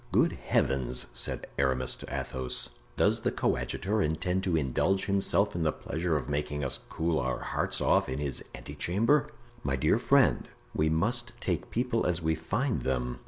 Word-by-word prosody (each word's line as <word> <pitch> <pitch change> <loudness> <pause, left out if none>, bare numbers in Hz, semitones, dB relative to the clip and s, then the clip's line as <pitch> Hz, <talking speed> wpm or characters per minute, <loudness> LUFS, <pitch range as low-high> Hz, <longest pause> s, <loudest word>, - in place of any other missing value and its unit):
"Good - - +4
heavens!" 65 -2 0
said - - -1
Aramis 65 -2 +2
to - - -10
Athos, 65 -1 -2 0.3
"does - - +3
the - - +1
coadjutor 105 +2 0
intend 90 +4 0
to 90 -3 +2
indulge 80 +7 +1
himself 100 +1 +2
in 85 - -2
the 80 -1 +2
pleasure 80 +1 -2
of 65 -4 -2
making 75 0 -2
us 65 - 0
cool 80 -1 0
our 65 +1 -1
hearts - - -1
off - - +3
in 65 - -2
his 70 -3 -2
ante - - -9
chamber?" 115 - +2 0.4
"My 70 - 0
dear 65 - +2
friend, - - +3 0.3
we 80 +1 +2
must 120 +9 0
take 90 -5 -2
people 120 -1 0
as 85 -1 +1
we 80 -1 +1
find 105 - -1
them. 60 -2 -1
80 Hz, 170 wpm, -29 LUFS, 65-95 Hz, 0.4 s, Good